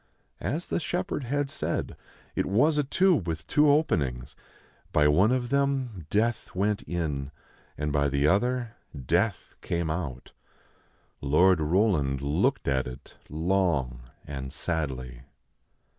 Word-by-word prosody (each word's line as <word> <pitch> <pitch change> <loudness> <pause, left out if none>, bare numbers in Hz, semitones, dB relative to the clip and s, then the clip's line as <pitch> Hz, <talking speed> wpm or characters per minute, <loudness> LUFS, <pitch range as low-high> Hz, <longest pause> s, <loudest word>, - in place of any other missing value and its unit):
As 165 +4 -3
the - - 0
shepherd 175 -5 -2
had 145 +3 0
said, - - -3 0.4
it - - 0
was 145 +10 +3
a - - +3
tube 165 - +2
with 80 -1 -3
two 150 - +4
openings. 70 - +1 0.6
By 75 -1 +4
one 95 +10 +4
of 125 -1 0
them 135 - 0
death 110 +1 0
went 100 +2 +1
in, 75 -6 -2 0.5
and 75 0 -2
by 70 0 +2
the 70 +1 +1
other 120 +7 +1 0.3
death 90 - 0
came 85 -2 -1
out. 75 -7 -5 0.9
Lord 85 +6 +4
Roland 75 -5 +2
looked 85 - 0
at 65 -2 +1
it 65 +1 -10
long 80 -7 0 0.2
and 65 -2 -6
sadly. 65 -7 -3
85 Hz, 130 wpm, -27 LUFS, -, 0.9 s, two